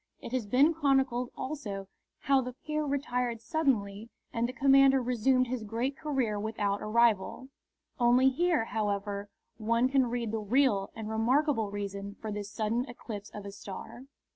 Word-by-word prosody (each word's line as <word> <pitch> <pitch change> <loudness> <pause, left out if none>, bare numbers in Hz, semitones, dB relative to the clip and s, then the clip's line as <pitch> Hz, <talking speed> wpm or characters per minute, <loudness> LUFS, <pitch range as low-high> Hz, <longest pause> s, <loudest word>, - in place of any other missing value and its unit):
It - - -8
has 250 -5 -1
been 275 +9 +4
chronicled 270 -5 +1
also 210 -9 -5 0.3
how 275 -1 +3
the 250 0 -5
peer 305 +3 -3
retired 250 -4 -1
suddenly 225 -7 -1 0.2
and 235 +1 0
the - - -3
commoner 270 0 +5
resumed 250 +1 +2
his 250 -2 -4
great 230 +6 -2
career 265 -9 -1
without 205 -2 -1
a - - -5
rival. 235 +2 +2 0.5
Only 245 +2 +5
here, 320 -2 +1
however, 205 -2 -2 0.3
one 230 +3 +2
can 265 -2 +3
read 235 -2 -2
the 225 - -1
real 215 -2 +2
and 220 -1 -6
remarkable 225 +1 +1
reason 200 0 -5
for 220 - -5
this 205 -1 -5
sudden 220 +3 -1
eclipse 215 -4 -7
of 205 -1 -9
a 200 - -6
star. 200 +5 -9
235 Hz, 160 wpm, -30 LUFS, 210-265 Hz, 0.5 s, commoner